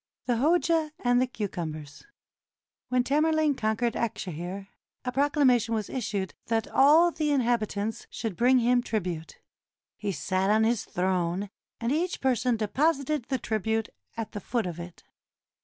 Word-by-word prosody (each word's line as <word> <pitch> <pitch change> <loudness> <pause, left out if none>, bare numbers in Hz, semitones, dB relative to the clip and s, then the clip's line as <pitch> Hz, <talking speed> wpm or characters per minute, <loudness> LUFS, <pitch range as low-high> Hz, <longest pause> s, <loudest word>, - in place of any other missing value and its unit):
THE 245 -2 +1
HOJA 320 +2 +2
AND 245 0 +3
THE 255 - +2
CUCUMBERS 165 - -6 0.8
When 250 0 +2
Tamerlane 305 +2 +2
conquered 225 -1 0
Akshehir, 190 -2 -4 0.4
a 250 - -1
proclamation 260 -4 +3
was 215 -2 -3
issued 210 -6 -3
that 225 -1 0
all 315 +6 +5
the 310 -2 -1
inhabitants 225 -5 0
should 220 -5 -4
bring 250 +5 +4
him 245 0 +3
trib 220 -5 -2
ute. 165 -3 -5 0.6
He 205 -2 -2
sat 185 +4 -1
on 215 +1 +4
his 225 0 +1
throne, 185 +1 -1 0.3
and 235 +1 -1
each 345 +5 0
person 250 -2 +1
deposited 280 +4 0
the 265 - +1
tribute 220 -1 -1 0.3
at 225 -2 -4
the 205 - -5
foot 235 +3 -1
of 175 -1 -5
it. 170 0 -9
230 Hz, 145 wpm, -27 LUFS, 200-265 Hz, 0.8 s, all